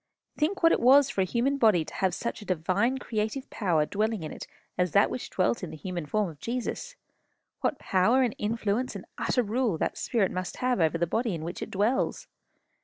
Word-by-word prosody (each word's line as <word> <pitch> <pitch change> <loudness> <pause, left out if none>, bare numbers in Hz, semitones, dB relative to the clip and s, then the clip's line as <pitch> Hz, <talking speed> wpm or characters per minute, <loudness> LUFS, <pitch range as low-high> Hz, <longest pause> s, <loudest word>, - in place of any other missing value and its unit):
Think 335 +5 -1
what 330 - +7
it - - +3
was 275 +3 +6
for 195 - 0
a - - +3
human 250 +8 0
body 210 -9 +4
to - - -10
have 190 -3 0
such 235 - -4
a - - -9
divine 190 +8 +1
creative 220 +2 -3
power 170 -8 +1
dwelling 215 +1 -1
in 155 - -5
it - - -8 0.3
as 180 -3 0
that 200 - +4
which 250 - -5
dwelt 185 +3 0
in 180 - -4
the - - -8
human 175 0 -5
form 210 +4 +1
of 155 -4 -10
Jesus! 255 - -4 0.6
What - - 0
power, 220 +8 +3
and 240 -4 0
influence, 220 +3 -1
and - - -7
utter 250 - +1
rule 225 -3 0
that - - -2
spirit 220 -6 +1
must 185 0 -4
have 250 -3 0
over 165 0 +2
the 170 - +1
body 225 +3 -1
in 160 - -6
which 170 +2 -5
it - - -4
dwells! 215 +7 0
210 Hz, 215 wpm, -28 LUFS, 180-250 Hz, 0.6 s, what